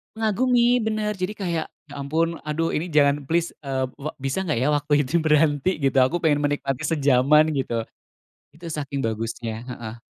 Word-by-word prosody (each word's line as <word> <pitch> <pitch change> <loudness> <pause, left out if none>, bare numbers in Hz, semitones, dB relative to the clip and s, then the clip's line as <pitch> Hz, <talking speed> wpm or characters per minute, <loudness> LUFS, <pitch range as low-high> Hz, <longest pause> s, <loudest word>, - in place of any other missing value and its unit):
Mengagumi 240 +3 +2
bener 215 -1 -1
jadi 185 +3 -2
kayak, 170 -5 -2 0.2
ya 145 - -11
ampun 160 +4 -1
aduh 155 +2 -1
ini 165 +4 -1
jangan 145 -1 +3
please, 170 +2 0
eee, 130 -1 -1
ve 145 +2 -5
bisa 135 +8 -2
nggak 155 -8 0
ya 130 - +1
waktu 145 0 -1
itu 150 - -2
berhenti 150 +2 +2
gitu 135 -2 +1
aku 165 +7 0
pengen 150 -3 +3
menikmati 145 -2 -1
sejaman 145 0 +4
gitu. 120 -4 -1 0.7
Itu 170 +2 -13
saking 140 -2 -4
bagusnya, 115 0 -3
heeh. 115 -2 -7
150 Hz, 165 wpm, -23 LUFS, 135-170 Hz, 0.7 s, sejaman